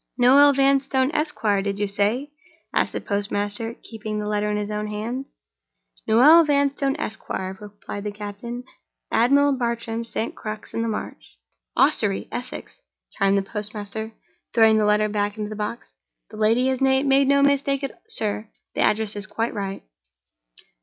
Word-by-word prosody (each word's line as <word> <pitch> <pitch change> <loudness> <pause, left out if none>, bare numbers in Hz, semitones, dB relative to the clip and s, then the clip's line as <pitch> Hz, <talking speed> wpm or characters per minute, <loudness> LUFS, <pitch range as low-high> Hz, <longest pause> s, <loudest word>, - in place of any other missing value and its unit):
"'Noel 275 +3 +7
Vanstone, 270 0 +2
Esquire,' 220 -11 0
did 200 0 -2
you 205 0 0
say?" 210 +8 0 0.4
asked - - +1
the - - -2
postmaster, 205 +2 -2
keeping 215 -1 -5
the 210 - -3
letter 210 0 0
in 210 - 0
his 210 0 -3
own 210 0 -2
hand. 225 +6 -4 0.8
"'Noel 295 +10 +7
Vanstone, 280 -2 +1
Esquire,'" 190 -8 -4
replied 205 0 -8
the 210 - -2
captain, 210 +4 -7 0.5
"'Admiral 280 +4 +4
Bartram's, 235 -2 -3
St. 225 - -3
Crux 215 0 -7
in 230 - -1
the 230 - -1
Marsh.'" 210 - -6 0.4
"Ossory, - - +2
Essex," - - -7 0.3
chimed 195 0 +2
in 195 - +1
the - - -19
postmaster, 210 +1 -5 0.4
throwing 220 -1 +6
the 210 - +2
letter 210 0 +3
back 205 0 -2
into 210 0 -4
the - - -5
box. 210 +3 -5 0.4
"The 215 - -10
lady 225 +4 +3
has 260 -1 -1
made 265 0 +3 0.2
no 280 0 +4
mistake, 280 0 +2 0.2
sir. 215 - -2 0.2
The - - -1
address 215 0 +1
is 205 -2 -5
quite 230 +3 -2
right." 195 -2 -4
220 Hz, 155 wpm, -23 LUFS, 210-260 Hz, 0.8 s, Noel